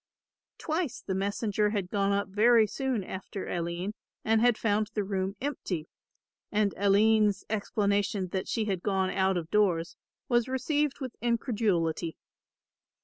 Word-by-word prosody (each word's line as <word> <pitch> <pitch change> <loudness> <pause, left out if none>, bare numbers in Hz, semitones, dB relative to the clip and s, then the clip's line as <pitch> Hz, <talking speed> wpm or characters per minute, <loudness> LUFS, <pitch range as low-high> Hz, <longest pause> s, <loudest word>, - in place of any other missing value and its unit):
Twice 315 -5 -2
the 190 - -2
messenger 205 +2 0
had 200 -4 -2
gone 200 -1 +1
up 200 0 0
very 220 +3 +5
soon 255 0 -2
after 190 +1 -6
Aline 175 +3 -3 0.3
and 220 0 +3
had 240 -2 +4
found 210 -1 +1
the 210 - +1
room 195 0 -2
empty; 190 - -3 0.6
and 210 -1 +2
Aline's 205 0 +3
explanation 200 -2 0
that 190 +1 -3
she 225 - -1
had 190 -4 -1
gone 190 -1 0
out 190 -1 +1
of 165 -1 -5
doors 180 -5 +2 0.3
was 240 -1 +2
received 290 +2 0
with 255 -3 -5
incredulity. 205 - 0
205 Hz, 140 wpm, -29 LUFS, 190-225 Hz, 0.6 s, very